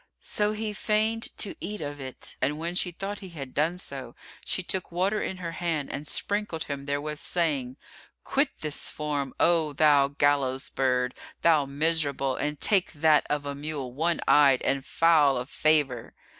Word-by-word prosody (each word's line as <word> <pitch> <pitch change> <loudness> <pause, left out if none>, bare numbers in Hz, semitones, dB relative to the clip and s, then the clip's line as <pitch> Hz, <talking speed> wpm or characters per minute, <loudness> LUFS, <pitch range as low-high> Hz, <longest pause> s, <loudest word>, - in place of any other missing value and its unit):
So 210 0 0
he 215 0 -3
feigned 220 +2 +1
to 205 - -2
eat 210 0 -4
of 145 -1 -5
it 130 -1 -7
and 145 +3 0
when 170 +2 -3
she 180 0 +2
thought 195 +4 -5
he 190 - -9
had 140 -6 -8
done 165 +4 +1
so, 135 -8 -7 0.3
she 185 - -1
took 185 0 -2
water 190 +5 0
in 190 - -3
her 175 -2 -5
hand 165 -4 -2
and 145 +1 -6
sprinkled 205 -5 -1
him 140 -1 -6
therewith, 145 +1 -2
saying, 145 -7 -1 0.5
"Quit 275 +1 +2
this 155 -1 -3
form, 145 -3 -3
O 165 -3 +3
thou 145 -2 +5
gallows 140 -2 +1
bird, 125 -1 +1 0.3
thou 155 -4 +4
miserable, 140 -2 0
and 150 +1 -2
take 195 -5 +3
that 155 0 +3
of 145 -1 -1
a 140 - -3
mule 140 -3 -4
one 165 +4 0
eyed 140 -3 +6
and 135 -1 0
foul 150 -2 +4
of 125 +2 -5
favour." 145 -6 +1
150 Hz, 170 wpm, -27 LUFS, 140-175 Hz, 0.5 s, eyed